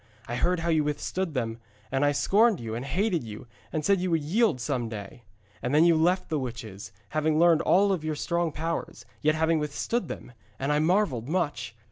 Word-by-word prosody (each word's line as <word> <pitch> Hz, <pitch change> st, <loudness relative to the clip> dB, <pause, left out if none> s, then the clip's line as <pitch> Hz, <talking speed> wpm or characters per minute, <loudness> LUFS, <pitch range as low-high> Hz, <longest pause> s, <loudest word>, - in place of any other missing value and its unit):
I 120 Hz, -, -4 dB
heard 175 Hz, +6 st, +1 dB
how 170 Hz, -, -1 dB
you 160 Hz, -2 st, +3 dB
withstood 150 Hz, +3 st, -2 dB
them, 115 Hz, -2 st, -2 dB, 0.3 s
and 135 Hz, +1 st, +1 dB
I 145 Hz, -, +4 dB
scorned 205 Hz, +8 st, +3 dB
you 115 Hz, -2 st, -5 dB
and 120 Hz, +2 st, -4 dB
hated 175 Hz, -, 0 dB
you 110 Hz, 0 st, -8 dB, 0.3 s
and 155 Hz, -2 st, -2 dB
said 195 Hz, 0 st, +3 dB
you 185 Hz, -, -1 dB
would 165 Hz, -3 st, +1 dB
yield 200 Hz, -, +2 dB
some 120 Hz, -1 st, -2 dB
day. 105 Hz, +1 st, -8 dB, 0.4 s
And 125 Hz, +4 st, -1 dB
then 160 Hz, +2 st, +6 dB
you 170 Hz, -1 st, +5 dB
left 175 Hz, +4 st, +2 dB
the 155 Hz, -2 st, 0 dB
witches, 110 Hz, -6 st, -7 dB, 0.2 s
having 155 Hz, 0 st, +1 dB
learned 170 Hz, -1 st, +5 dB
all 195 Hz, +2 st, +4 dB
their 155 Hz, -2 st, -3 dB
strong 170 Hz, +2 st, -1 dB
powers, 165 Hz, +1 st, -4 dB, 0.2 s
yet 155 Hz, +1 st, +3 dB
having 160 Hz, 0 st, +2 dB
withstood 160 Hz, +8 st, -2 dB
them, -, -, -7 dB, 0.3 s
and 135 Hz, +2 st, -1 dB
I 150 Hz, -, +2 dB
marvelled 155 Hz, -, +1 dB
much. 145 Hz, -10 st, -2 dB
155 Hz, 200 wpm, -27 LUFS, 130-175 Hz, 0.4 s, then